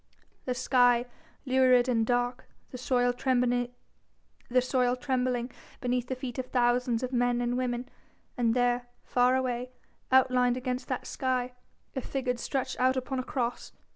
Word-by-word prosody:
The 250 - -1
sky 245 -1 +3 0.4
lurid 255 -1 +4
and 225 -3 +1
dark, 245 0 0 0.2
the 250 - -6
soil 245 -1 +2
trembling 245 -1 +1 0.8
beneath 250 -1 -1
the 260 - -2
feet 255 -1 -6
of 255 - -3
thousands 245 -1 +1
of 255 +1 -3
men 245 0 +2
and 245 0 0
women, 250 -1 -2 0.5
and 235 -1 +1
there, 245 0 +1 0.2
far 250 +1 +3
away, 250 -1 -1 0.4
outlined 255 -1 +4
against 255 0 -3
that 255 - -3
sky, 255 -1 -1 0.4
a 265 - -1
figure 255 -1 -2
stretched 260 +1 -3
out 260 +1 +3
upon 260 +1 -2
a - - -2
Cross. 245 -2 -3
250 Hz, 140 wpm, -29 LUFS, 245-255 Hz, 0.8 s, lurid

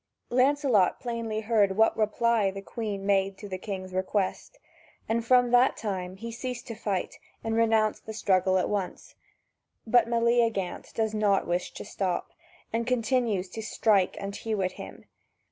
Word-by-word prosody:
Lancelot 255 -6 +3
plainly 230 -3 -3
heard 210 -3 +2
what 220 0 +4
reply 220 -1 +2
the 195 +1 -7
Queen 205 -3 -4
made 195 -1 +1
to 205 - -8
the 185 -1 -5
king's 185 -2 -6
request, 190 - -2 0.5
and 230 +1 0
from 245 0 +4
that 245 +2 +4
time 185 -4 -4
he 230 +4 -7
ceased 245 +1 -5
to 230 - -6
fight 195 -4 -3 0.2
and 225 0 -1
renounced 220 -2 +2
the 220 - -5
struggle 190 -2 +2
at 185 - +1
once. 200 -3 -4 0.7
But 240 +1 +4
Meleagant 230 -4 +1
does 220 -1 0
not 205 -2 +2
wish 175 +1 -1
to - - -7
stop, 190 -3 -2 0.4
and 230 +1 -1
continues 235 -5 +1
to 220 - -6
strike 210 -3 +2
and 200 0 -5
hew 215 -3 -2
at 185 - 0
him. - - -10
215 Hz, 160 wpm, -27 LUFS, 195-230 Hz, 0.7 s, what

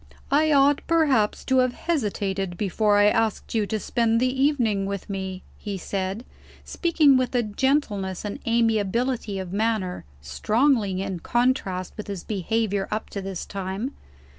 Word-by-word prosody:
"I 310 +2 +4
ought 280 0 +4
perhaps 285 -11 +2
to 260 -1 +3
have 255 -1 +2
hesitated, 200 - -2
before 205 +1 +2
I 205 - +5
asked 225 0 +1
you 215 -3 +1
to 220 - -2
spend 230 +2 +1
the 255 +2 0
evening 225 -9 +1
with 200 -1 -4
me," 190 -1 -5 0.2
he 200 -2 -4
said, 195 +5 -3 0.4
speaking 310 -6 +3
with 255 0 -1
a 245 - +3
gentleness 210 -5 -1
and 205 - -4
amiability 230 -1 +1
of 185 -1 -5
manner, 215 -3 -1 0.2
strongly 200 - +1
in 190 -3 -4
contrast 240 -6 0
with 210 - -6
his 200 -3 -5
behavior 205 0 -1
up 215 +1 -3
to 200 - -4
this 190 -2 -5
time. 195 +6 -4
215 Hz, 150 wpm, -24 LUFS, 195-255 Hz, 0.4 s, I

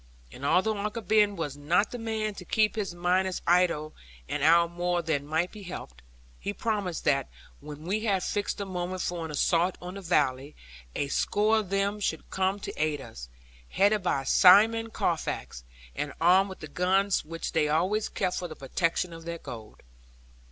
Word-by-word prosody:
And 130 - -12
although 200 +8 +2
Uncle 210 +3 -3
Ben 210 0 +3
was 150 -6 -4
not 165 +8 +1
the 245 - -5
man 220 -2 -2
to 195 - -9
keep 215 +4 +1
his 195 -5 -3
miners 180 +1 0
idle 170 -3 +2 0.3
an 150 - -3
hour 170 +3 +5
more 175 0 -1
than 145 -3 -1
might 160 +4 0
be 210 - -11
helped, 60 - -8 0.4
he 200 - -3
promised 205 -6 -2
that 140 -2 +1 0.3
when 150 +1 -10
we 195 +6 -1
had 200 -4 0
fixed 205 -1 -2
the 200 - -4
moment 185 -1 -3
for 175 -2 -3
an - - -6
assault 170 +4 +1
on 180 +1 -7
the 200 - -7
valley, 140 -5 0 0.4
a 145 - -1
score 215 +8 +2
of 205 -4 -5
them 200 +1 0
should 160 -6 -3
come 190 +1 0
to - - -5
aid 155 -2 0
us, - - -10 0.4
headed 205 +1 +3
by 140 -7 0
Simon 220 +10 +6
Carfax, - - -2 0.3
and 145 - -3
armed 185 +4 +5
with 190 - -10
the 155 - -6
guns 190 +5 +1
which 165 +2 -5
they 155 -3 +1
always 185 +8 +1
kept 185 -2 -1
for 180 - -4
the 155 - -9
protection 165 +5 -1
of 165 0 -10
their 170 0 -4
gold. 110 -8 -10
180 Hz, 185 wpm, -28 LUFS, 155-200 Hz, 0.4 s, Simon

